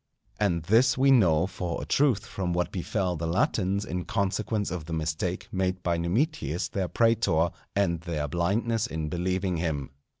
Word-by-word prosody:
And 90 -6 +1
this 120 +8 +4
we 135 +1 +5
know 90 -10 +5
for 90 -2 -4
a - - -5
truth 125 -7 +2
from 95 -7 -3
what 90 0 0
befell 90 0 -1
the 80 0 -3
Latins 95 +3 +1
in 90 -2 -4
consequence 100 +1 -1
of 90 -4 -4
the 80 - -6
mistake 80 +3 -2
made 95 -1 -1
by 85 -1 +1
Numitius 85 - -1
their 95 -2 -2
prætor, 100 -8 +2 0.2
and 85 -5 +1
their 80 -4 -3
blindness 105 - 0
in 80 -7 -3
believing 90 +1 -1
him. 75 -5 -2
90 Hz, 165 wpm, -27 LUFS, 85-105 Hz, 0.2 s, we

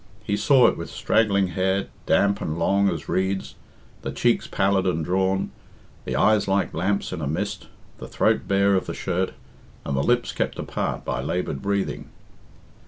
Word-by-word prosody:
He 100 -1 -1
saw 130 +3 +5
it - - +3
with - - -6
straggling 100 -4 +2
hair, 95 +2 0 0.2
damp 100 0 +3
and 80 +1 -3
long 100 +4 +2
as 80 -5 -4
reeds, 95 +1 -1 0.5
the - - -4
cheeks - - +1
pallid 95 -1 +1
and 80 -3 0
drawn, 95 +2 0 0.5
the 65 - -2
eyes 105 +10 +3
like 95 0 +1
lamps 95 +3 -1
in 85 - -4
a 70 - -2
mist, 95 +5 -3 0.3
the - - -7
throat - - +1
bare 100 0 +3
of 95 - +1
the - - -4
shirt, 95 0 -1 0.5
and 70 - -2
the 70 - +1
lips 120 +9 +1
kept - - -2
apart - - -3
by 65 0 -2
laboured 70 -1 -2
breathing. 100 -1 -2
95 Hz, 170 wpm, -24 LUFS, 90-100 Hz, 0.5 s, saw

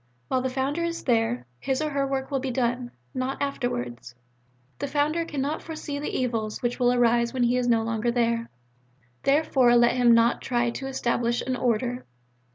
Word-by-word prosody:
While 260 - +1
the 260 - -1
Founder 275 +5 -1
is 335 0 -3
there, 225 - +1
his 265 -1 -1
or 305 -1 -1
her 275 -1 0
work 270 0 -3
will 275 - +1
be 265 0 -3
done, 245 0 -1 0.2
not 255 +1 -2
afterwards. 125 - -3 0.6
The 285 - -2
Founder 300 +4 0
cannot 295 0 -2
foresee 310 -3 -5
the 295 - -3
evils 225 -4 -2
which 240 +1 -1
will 245 -1 +4
arise 235 0 +2
when 250 - +1
he 240 +1 +3
is 250 -1 +1
no 230 -2 +3
longer 225 +1 -1
there. 235 -1 0 0.7
Therefore 275 -4 +3
let 240 0 +5
him 240 -2 +5
not 230 +1 +3
try 240 -2 0
to 270 +3 -5
establish 240 -2 0
an 260 - -1
Order. 245 0 0
250 Hz, 180 wpm, -26 LUFS, 235-275 Hz, 0.7 s, let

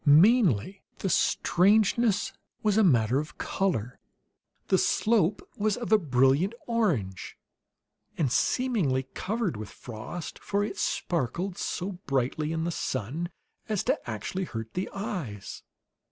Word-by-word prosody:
Mainly 180 - +5 0.2
the 195 - -2
strangeness 205 +3 +3 0.3
was 210 -2 +3
a 220 - +5
matter 125 - +4
of 150 +1 -6
color; 125 - -1 0.7
the 190 - +4
slope 210 -4 +2
was 210 -1 +1
of 240 -2 -5
a 215 - +7
brilliant 140 - +3
orange, 165 - -1 0.8
and 145 -7 +1
seemingly 190 - +1
covered 210 - -2
with 105 -1 -6
frost, 125 +9 -7
for 200 0 -1
it 210 - -4
sparkled 175 +4 -1
so 185 0 -3
brightly 135 +3 0
in 160 0 -1
the 170 - -1
sun 145 +4 -3 0.4
as 210 -3 0
to - - -1
actually 120 - -3
hurt 115 -6 -6
the 185 - -2
eyes. 170 - -5
175 Hz, 125 wpm, -28 LUFS, 130-205 Hz, 0.8 s, a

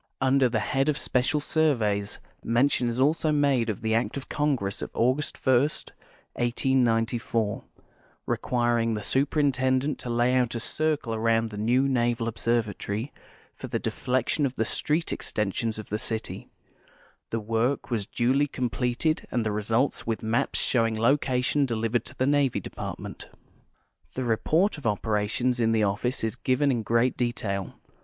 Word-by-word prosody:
Under 135 -1 +3
the 115 -1 0
head 135 +6 0
of 150 - +1
special 125 +4 +1
surveys, 115 -10 +1 0.3
mention 120 +1 +2
is 120 +2 -3
also 155 +3 +2
made 140 -6 +2
of 105 - -3
the 110 0 0
act 115 +4 0
of 135 - -6
Congress 135 -10 -1
of - - -4
August 130 +5 +1
1, 130 -2 +6 0.7
1894, 115 -3 +1 0.6
requiring 120 -2 +1
the 105 - -4
Superintendent 135 +1 +1
to 125 - -6
lay 120 +1 +2
out 125 -2 +1
a - - -1
circle 150 -1 -1
around 115 0 +1
the 105 - -8
new 125 +5 +2
Naval 120 -3 +1
Observatory 115 0 -2 0.4
for - - -8
the - - -1
deflection 130 +4 -1
of 130 - -8
the 115 - 0
street 155 +8 0
extensions 110 +2 -2
of 110 - -8
the 105 - -2
city; 110 0 -4 0.8
the 115 - -1
work 115 +5 -1
was 105 -4 -1
duly 130 +4 +1
completed 125 +4 -1
and 120 -2 -1
the 105 - 0
results 115 +7 0
with 115 -1 -2
maps 110 +1 0
show 120 -3 +2
ing 110 -1 -3
location 130 +2 +2
delivered 115 -2 0
to - - -10
the 130 - +1
Navy 140 -2 +2
Department. - - -7 0.9
The 130 - -2
report 155 - +1
of 135 - -3
operations 110 +4 0
in 115 -1 +2
the 110 - +2
otflce 105 +6 0
is 110 -1 -1
given 135 +2 +2
in 120 -3 0
great 115 +4 +2
detail. 110 -6 -2
120 Hz, 155 wpm, -26 LUFS, 115-135 Hz, 0.9 s, 1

